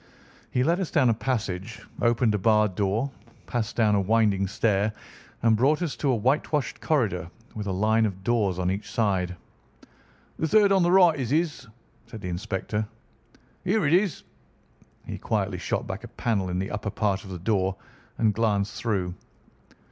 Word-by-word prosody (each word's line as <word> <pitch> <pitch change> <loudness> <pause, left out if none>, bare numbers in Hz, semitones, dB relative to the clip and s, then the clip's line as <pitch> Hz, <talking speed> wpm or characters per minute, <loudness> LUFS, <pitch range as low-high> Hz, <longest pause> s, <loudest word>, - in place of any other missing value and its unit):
He 125 - +1
led 170 +6 +2
us 185 - -2
down 130 -6 +3
a - - +4
passage, 110 -2 -3 0.2
opened 120 -1 +3
a 105 - 0
barred 105 0 +3
door, 105 +8 0 0.3
passed 115 -4 -3
down 110 -3 +3
a 100 - +3
winding 100 -1 +2
stair, 105 0 +1 0.5
and 115 -1 +5
brought 145 +9 +2
us 160 - -2
to 145 - 0
a - - +2
whitewashed 135 +5 0
corridor 105 - 0 0.2
with 105 -2 -5
a - - -1
line 110 +4 +2
of 95 -2 -7
doors 105 -5 +1
on 90 0 0
each 100 +2 -4
side. 95 -5 0 1.0
"The 160 - +1
third 205 +3 +5
on 195 -1 +4
the 175 0 +3
right 180 -5 +6
is 125 -4 -2
his," 150 -3 0 0.4
said 110 -2 -9
the 90 - -4
inspector. 105 +3 -3 0.8
"Here 195 +1 +1
it 150 - +3
is!" 185 0 +2 0.8
He - - -6
quietly 100 -4 -1
shot - - -2
back 100 +4 -6
a - - -7
panel 110 -5 -1
in 90 - -2
the 95 +1 -3
upper 105 0 -3
part 100 -1 -1
of 100 - -11
the 90 - -5
door 95 0 0 0.4
and 110 -2 +2
glanced 100 -2 0
through. 95 -6 -1
110 Hz, 180 wpm, -26 LUFS, 100-130 Hz, 1.0 s, right